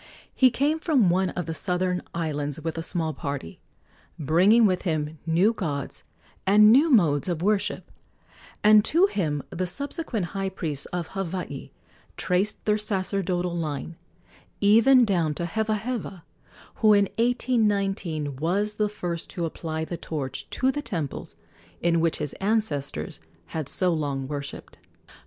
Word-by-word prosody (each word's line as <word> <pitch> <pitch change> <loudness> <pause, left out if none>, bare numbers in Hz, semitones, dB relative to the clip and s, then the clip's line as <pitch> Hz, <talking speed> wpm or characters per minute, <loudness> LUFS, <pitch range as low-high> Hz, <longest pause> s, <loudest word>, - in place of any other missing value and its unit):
He 260 - +5
came 285 +6 0
from 265 - +3
one 185 +1 +1
of 180 - -4
the 165 - -4
southern 180 +2 -1
islands 150 -3 -3
with 160 0 -4
a 165 - -3
small 165 -2 -1
party, 140 - -6 0.6
bringing 185 - +4
with 185 -3 +2
him 155 -3 -2
new 180 +7 +3
gods 145 - -4 0.4
and 210 +2 +7
new 285 +7 +5
modes 170 - +3
of 170 -1 -2
worship, 205 0 0 0.7
and 210 0 +7
to 340 - +4
him 155 - -1
the 180 +1 -2
subsequent 270 - -3
high 195 -1 -2
priests 155 -7 -3
of 175 -2 -4
Hawaii 180 -7 -5 0.5
traced 185 +4 0
their 210 0 +2
sacerdotal 185 -3 -1
line, 160 0 -4 0.6
even 230 +5 +6
down 170 -7 0
to 170 - -2
Hevaheva, 215 -1 -3 0.5
who 215 -1 +5
in 200 -1 +5
1819 200 - 0
was 200 +8 -1
the 210 -1 +1
first 175 -5 -5
to 170 - -2
apply 160 -1 -4
the 170 - -5
torch 145 -6 -5
to 260 +1 +1
the 290 - -4
temples 170 - -4 0.4
in 170 -1 +2
which 165 0 +1
his 150 -2 -3
ancestors 195 -9 -1 0.3
had 155 -4 -4
so 180 -2 +3
long 140 -4 -2
worshipped. 140 -1 -7
180 Hz, 140 wpm, -25 LUFS, 160-210 Hz, 0.7 s, and